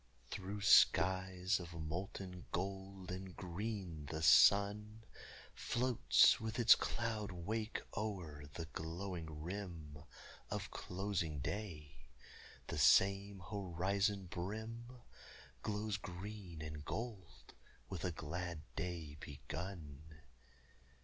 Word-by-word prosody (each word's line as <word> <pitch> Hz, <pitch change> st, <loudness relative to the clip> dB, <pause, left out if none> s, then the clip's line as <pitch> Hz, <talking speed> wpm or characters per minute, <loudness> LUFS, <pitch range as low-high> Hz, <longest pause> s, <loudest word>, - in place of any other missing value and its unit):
Through 100 Hz, +2 st, -4 dB
skies 95 Hz, -1 st, +5 dB
of 85 Hz, -1 st, -8 dB
molten 90 Hz, +3 st, -5 dB
gold 95 Hz, 0 st, -4 dB
and 95 Hz, 0 st, -6 dB
green 90 Hz, -4 st, -4 dB
the 80 Hz, +2 st, -3 dB
sun 105 Hz, +5 st, +6 dB, 0.5 s
Floats 120 Hz, -, +4 dB
with 110 Hz, 0 st, -3 dB
its 120 Hz, -2 st, +9 dB
cloud 110 Hz, -3 st, -1 dB
wake 105 Hz, +5 st, -3 dB
o'er 90 Hz, -9 st, -4 dB
the 80 Hz, +4 st, -5 dB
glowing 80 Hz, -1 st, -5 dB
rim 85 Hz, -6 st, -6 dB, 0.5 s
Of -, -, -3 dB
closing 90 Hz, -5 st, -2 dB
day; 75 Hz, -, -5 dB, 0.6 s
the -, -, -3 dB
same 100 Hz, +4 st, +5 dB
horizon 100 Hz, +1 st, 0 dB
brim 110 Hz, +6 st, -5 dB, 0.7 s
Glows 105 Hz, +2 st, -1 dB
green 95 Hz, -3 st, -7 dB
and 75 Hz, -1 st, -6 dB
gold 105 Hz, -1 st, -6 dB, 0.3 s
with 95 Hz, -3 st, -5 dB
a 90 Hz, -, 0 dB
glad 85 Hz, +1 st, -4 dB
day 80 Hz, -3 st, -4 dB
begun. 75 Hz, 0 st, -7 dB
95 Hz, 95 wpm, -38 LUFS, 80-100 Hz, 0.7 s, its